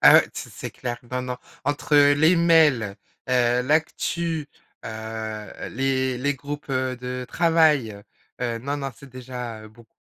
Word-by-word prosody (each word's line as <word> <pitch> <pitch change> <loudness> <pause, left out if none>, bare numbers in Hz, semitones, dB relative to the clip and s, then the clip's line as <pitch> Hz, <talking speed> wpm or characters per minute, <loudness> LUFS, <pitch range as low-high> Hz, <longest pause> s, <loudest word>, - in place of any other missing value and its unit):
Ah - - +9
ouais, - - +6
c'est - - -7
c'est - - -6
clair, 120 -1 -5
non 125 0 -2
non. 125 0 -4 0.3
Entre 145 +1 +1
les 145 +4 +6
mails, 155 -12 +4 0.3
heu, 125 -1 +3
l'actu, 160 +2 0 0.4
heu, 110 -1 -6
les 130 0 0
les 140 +2 0
groupes, 145 +2 -7
heu, 130 -1 0
de 125 0 -5
travail, 155 -11 +3 0.4
heu, 120 -2 -1
non 140 +5 -3
non, 135 -1 -3
c'est 140 +4 -14
déjà 125 -3 -7
beaucoup. 110 +1 -20
130 Hz, 150 wpm, -24 LUFS, 120-145 Hz, 0.4 s, Ah